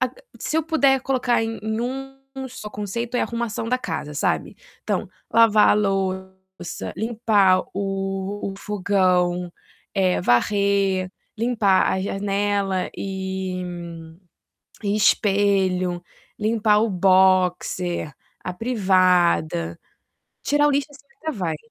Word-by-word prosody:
ac - - 0 0.3
se 310 - -2
eu 320 - +2
puder 280 -4 +3
colocar 250 -3 +1
em 225 0 -3
em 220 +1 -2
um 270 +1 -6
só 225 -4 -8
conceito 230 +4 -4
é - - +1
arrumação 230 -1 -3
da 255 +1 +1
casa, 150 -11 -4
sabe. 145 - -1 0.3
Então - - -2 0.2
lavar 225 -2 +6
a - - +5
louça, 190 -2 -3
limpar 215 -4 +3
o 195 0 -3
o - - -9
fogão, 180 -3 +1 0.4
eh, 185 -2 +2
varrer, 195 +5 +2 0.3
limpar 220 -5 +2
a 190 - -1
janela 200 -1 -1
e 190 -1 -4 1.2
e 200 0 0
espelho, 195 -3 +2 0.3
limpar 215 -1 +2
o 225 - +1
boxe, 185 -3 +2 0.3
a 180 - -4
privada. 180 - +2 0.6
Tirar 290 0 +3
o - - +3
lixo, 280 +1 0
assim, 280 0 -17 0.2
até 315 - -2
vai. 175 - -2
200 Hz, 115 wpm, -23 LUFS, 185-230 Hz, 1.2 s, lavar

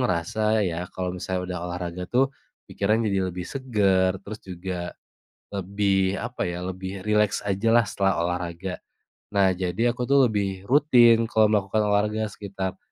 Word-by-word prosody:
ngerasa 110 +2 +1
ya 85 0 -2
kalau 90 -1 -3
misalnya 90 0 -3
udah 90 - -3
olahraga 90 0 -4
tuh 135 +2 +2 0.4
pikiran 105 +3 +1
jadi 95 -3 0
lebih 90 0 -5
segar, 95 -8 +1
terus 105 +2 -8
juga 90 -1 -5 0.6
lebih 100 0 0
apa 120 +4 -4
ya, 90 0 -4
lebih 95 +1 -5
rileks 105 -1 +2
ajalah 115 +4 +3
setelah 95 -3 +1
olahraga. 90 +1 -3 0.6
Nah, 100 -1 +4
jadi 95 +6 0
aku 125 -1 -3
tuh 140 -2 +6
lebih 100 -3 -2
rutin 120 -5 +5
kalau 110 -2 +5
melakukan 105 0 +1
olahraga 105 +1 +1
sekitar 95 -2 -5
100 Hz, 145 wpm, -25 LUFS, 90-110 Hz, 0.6 s, tuh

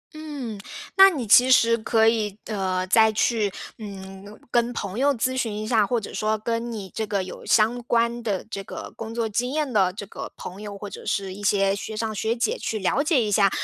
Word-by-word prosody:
嗯， 280 -9 -6 0.4
那 385 0 +9
你 280 -9 -3
其 245 +5 +6
实 230 -2 +5
可 225 0 +2
以， 215 -3 +1
呃， 185 -3 -1
再 220 +3 +5
去， 215 -1 +1 0.3
嗯， 195 0 -9
跟 240 0 +2
朋 205 -1 -4
友 285 +1 +4
咨 255 +2 0
询 235 -4 -1
一 215 0 -4
下， 220 -4 +3
或 240 -2 +1
者 205 - -8
说 215 +2 0
跟 230 +2 -3
你 200 -4 -6
这 220 - -2
个 200 -2 -1
有 185 - -9
相 230 +3 +3
关 235 0 +1
的 205 -5 -2
这 200 -3 -6
个 - - -8
工 225 0 -7
作 230 -1 0
经 240 +4 -1
验 295 -5 -1
的 190 -3 +3
这 205 +1 -7
个 - - -8
朋 190 +3 -8
友， 205 -1 -7
或 205 +1 -7
者 - - -9
是 195 -2 -2
一 205 - -10
些 195 -1 +2
学 215 +2 -6
长 220 -1 -2
学 220 +2 -1
姐 455 - -1
去 220 - -2
了 210 +7 +1
解 290 -5 +2
一 210 - -2
下， 200 -1 +4
220 Hz, 240 characters per minute, -24 LUFS, 200-235 Hz, 0.4 s, 那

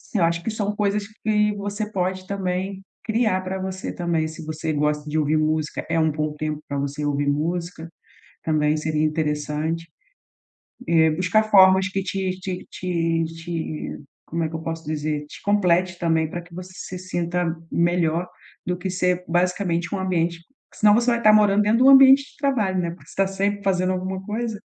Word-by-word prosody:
eu 190 - +3
acho 170 +1 +1
que 225 - -2
são 210 -1 -2
coisas 205 0 0
que 210 -1 0
você 205 +1 -4
pode 185 -1 -2
também 190 0 -3 0.2
criar 220 -4 +1
pra 190 +1 -4
você 190 0 -4
também, 170 -2 -1
se 155 0 -9
você 155 +1 -3
gosta 150 0 0
de 155 - -1
ouvir 155 0 +2
música, 155 0 -1
é 165 0 +1
um 160 -1 +3
bom 155 0 -2
tempo 155 0 -3
pra 140 - -3
você 140 +1 -3
ouvir 145 0 0
música, 170 +3 -2 0.5
também 150 -1 +2
seria 155 0 -1
interessante. 155 +1 -2 1.0
Eh, 160 -1 +5
buscar 185 +7 +2
formas 190 -2 +6
que 195 +1 -2
te 190 0 -2
te 185 -1 -5
te 165 -2 -1
te 165 -1 -5 0.3
como 165 +1 -2
é - - -1
que 160 - -5
eu - - -6
posso 165 0 -5
dizer, 150 -1 -2
te - - -12
complete 185 -3 +2
também 160 -2 +1
pra 175 +2 -5
que 170 0 -19
você 185 +1 -8
se 185 0 -7
sinta 175 -2 -2
melhor 170 0 +1 0.4
do 180 - -1
que 185 +1 -4
ser 180 -1 0
basicamente 175 0 0
um - - -1
ambiente 170 -2 0 0.3
senão 210 -1 +5
você 240 +2 +3
vai 235 0 -1
tá 215 - +7
morando 210 -1 +5
dentro 210 +2 +3
do - - +8
ambiente 270 0 +8
de - - -26
trabalho, 225 -10 0
né, 170 -1 -1
porque 170 - -13
você - - -13
tá 195 - +3
sempre 200 +1 -1
fazendo 185 -2 +1
alguma 185 +1 -3
coisa. 220 +1 -3
180 Hz, 185 wpm, -23 LUFS, 160-195 Hz, 1.0 s, do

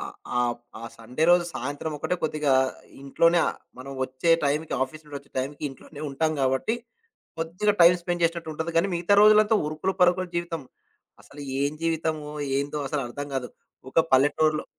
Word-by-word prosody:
ఆహ్, - - -8 0.3
ఆహ్, 120 -1 +1 0.2
ఆ - - -10
సండే 125 +7 -2
రోజు 175 0 +5
సాయంత్రం 145 +4 -4
ఒకటే 180 - -1
కొద్దిగా 150 -3 +1 0.5
ఇంట్లోనే. 165 +5 +3
ఆ - - +2 0.3
మనం 135 +2 -8
వచ్చే 130 +5 -1
టైమ్‌కి 150 +3 0
ఆఫీస్ 155 +4 -6
నుండి 145 -1 -8
వచ్చే 140 - -24
టైంకి 140 +3 -4
ఇంట్లోనే 145 +2 -12
ఉంటాం 155 +3 0
గాబట్టి. 130 - +1 0.6
కొద్దిగా 180 +6 0
టైమ్ 175 +1 +7
స్పెండ్ 175 0 -2
చేసినట్టు 165 -1 -1
ఉంటది. 160 +2 -3
కానీ 195 +4 +3
మిగతా 175 +4 +2
రోజులంతా 215 0 +6
ఉరుకులు 155 +5 -2
పరుకుల 180 +1 +3
జీవితం. 170 -3 -3 0.6
అసలు 145 - -13 0.2
ఏం 140 +1 +1
జీవితమో? 160 -2 -1 0.3
ఏందో? 145 +1 -3
అసలర్థం 145 0 -4
కాదు. 125 -2 -2 0.4
ఒక 165 - +4
పల్లెటూరులో 150 +3 +3
155 Hz, 160 wpm, -25 LUFS, 140-170 Hz, 0.6 s, టైమ్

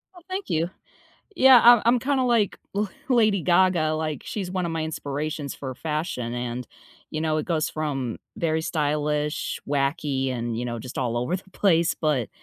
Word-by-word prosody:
Oh, 355 - -13
thank 380 +1 -4
you. 165 +2 0 0.7
Yeah, 265 -5 +8
I'm 240 -1 +8
I'm 240 +1 +4
kinda 265 0 +1
like, 235 -5 +2
La 205 +1 0 0.2
Lady 215 -6 +3
Gaga, 175 -3 +3
like, 155 -3 -3
she's 190 -4 -4
one 185 -1 -1
of 170 - -2
my 160 -1 -2
inspirations 150 -1 -4
for 130 -2 -6
fashion 150 -4 -3
and, 120 0 -4 0.4
you 155 - -3
know, 155 -1 +1
it 150 - -2
goes 160 -3 0
from 135 -6 -3 0.2
very 160 -1 0
stylish, 150 -1 -1
wacky, 140 -1 0
and, 120 -2 -3
you 125 - -2
know, 120 -1 -4
just 125 +3 -8
all 120 -3 -1
over 125 +9 0
the 190 +1 -10
place, 170 -4 +2
but 145 -9 0
155 Hz, 180 wpm, -25 LUFS, 135-185 Hz, 0.7 s, Yeah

